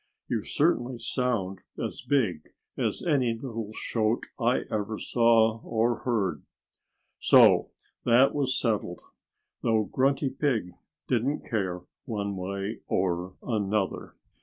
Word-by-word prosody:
You - - -1
certainly 120 0 +1
sound 115 -7 -1 0.2
as - - -4
big 105 - -1 0.2
as - - -1
any 130 -8 +2
little 115 -3 -5
shote 110 +1 -1
I 120 +1 +2
ever 105 0 -2
saw 115 -1 +3
or 115 +1 +1
heard." 100 - -1 0.8
So - - +6 0.3
that 125 +3 +5
was 140 -2 0
settled 105 -7 -1 0.6
though 110 -1 +2
Grunty 135 +4 +1
Pig 115 -11 0 0.4
didn't 130 +4 0
care 95 -5 -2 0.2
one 100 -3 -3
way 100 +3 -4
or 90 0 -1
another. 105 -3 -1
115 Hz, 110 wpm, -27 LUFS, 100-125 Hz, 0.8 s, So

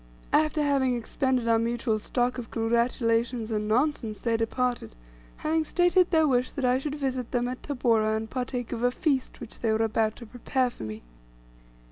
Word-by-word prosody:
After 305 0 +3
having 270 -3 +2
expended 250 +1 -1
our 230 -1 +4
mutual 230 -1 0
stock 245 +3 -1
of 230 - -7
congratulations 230 0 0
and 210 -1 -1
nonsense, 230 -2 0
they 230 -1 0
departed, 235 - -1 0.4
having 315 +1 0
stated 355 +2 +3
their 320 -3 +4
wish 250 -2 +2
that 275 -3 -2
I 250 +1 +3
should 290 +1 -4
visit 260 -4 -2
them 245 -1 0
at 255 +1 -5
Tabora 225 -6 +1
and 220 0 -4
partake 245 0 -4
of 235 - -3
a 245 - +4
feast 270 0 -1
which 240 -2 -9
they 225 - +1
were 220 +1 +2
about 220 0 0
to 235 - -10
prepare 250 +2 -1
for - - -13
me. 110 0 -6
245 Hz, 180 wpm, -27 LUFS, 225-265 Hz, 0.4 s, our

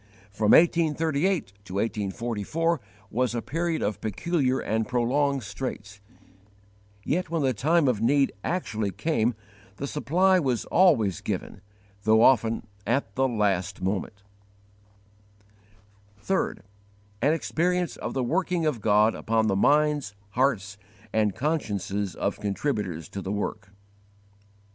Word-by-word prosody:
From 105 +1 +2
1838 160 - +3
to 95 0 -8
1844 115 - -1 0.3
was 125 +1 0
a 120 - -1
period 165 +1 -1
of 105 0 -2
peculiar 130 - 0
and 110 +1 -1
prolonged 130 +2 +1
straits, 105 -1 -6 1.0
yet 175 +2 -1
when 165 -3 -1
the 130 -1 +2
time 155 +7 +2
of 115 -5 +1
need 135 +4 +3
actually 110 - -2
came 115 - 0 0.4
the 135 - -4
supply 180 +9 +2
was 130 -7 -1
always 125 - +3
given, 95 - -4 0.4
though 110 +2 +4
often 115 -3 +3 0.2
at 130 +5 0
the 135 +1 +2
last 100 -6 -1
moment. 100 +1 -3 2.0
3. 190 0 0 0.7
An 145 +5 +4
experience 175 +2 0
of - - -5
the 130 - 0
working 170 +4 0
of 140 -8 0
God 105 +1 +4
upon 110 0 0
the 100 -3 +1
minds, 145 -1 +2 0.2
hearts, 105 -5 0 0.3
and 105 -3 +1
consciences 105 - -2
of 100 - -2
_contributors 100 - -2
to 100 - -5
the 95 - -4
work. 105 0 -3
120 Hz, 120 wpm, -26 LUFS, 105-150 Hz, 2.0 s, though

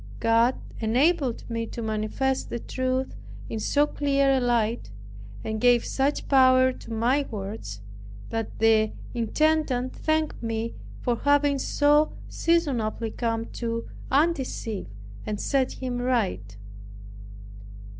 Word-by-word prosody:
God 230 +2 +3 0.2
enabled 255 +3 +1
me 230 -1 -3
to 235 - -6
manifest 220 +5 -1
the - - -3
truth 255 +2 -2 0.4
in 225 - -3
so 290 +7 +2
clear 280 -2 +1
a 265 - +3
light, 235 - 0 0.5
and 220 0 -3
gave 245 -1 +4
such 275 +2 0
power 260 -1 +5
to 235 - -11
my 250 +6 +1
words, 195 - -6 0.5
that 225 -1 -3
the 220 -1 +3 0.2
intendant 260 +1 +1
thanked 310 -1 -1
me 225 0 -2 0.3
for 240 -1 0
having 285 0 +3
so 295 +3 +3
seasonably 245 -10 0
come 230 -1 -2
to 230 -1 -3 0.2
undeceive, 270 - 0 0.4
and 210 -1 -2
set 270 -2 +1
him 250 -2 -4
right. 205 - -1
245 Hz, 115 wpm, -26 LUFS, 225-275 Hz, 0.5 s, power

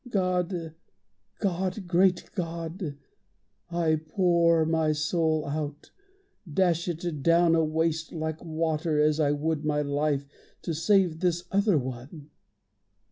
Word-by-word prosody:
God, 180 -4 -1 0.6
God! 190 0 -2
Great 180 +1 +2
God! 165 -3 -4 0.7
I 165 -3 +1
pour 170 -4 +3
my 160 -1 +1
soul 155 0 0
out, 145 0 -5 0.6
dash 170 +1 +1
it 170 -3 -3
down 170 +2 +4
awaste 160 0 0
Like 160 -1 -4
water, 160 -1 -1
as 150 +1 +3
I 145 -2 +3
would 150 +1 -1
my 150 -1 0
life, 145 0 0 0.4
to 170 - -2
save 170 0 +2
This 175 -1 0
other 200 -2 +3
one. 135 +4 -6
165 Hz, 115 wpm, -27 LUFS, 155-175 Hz, 0.7 s, down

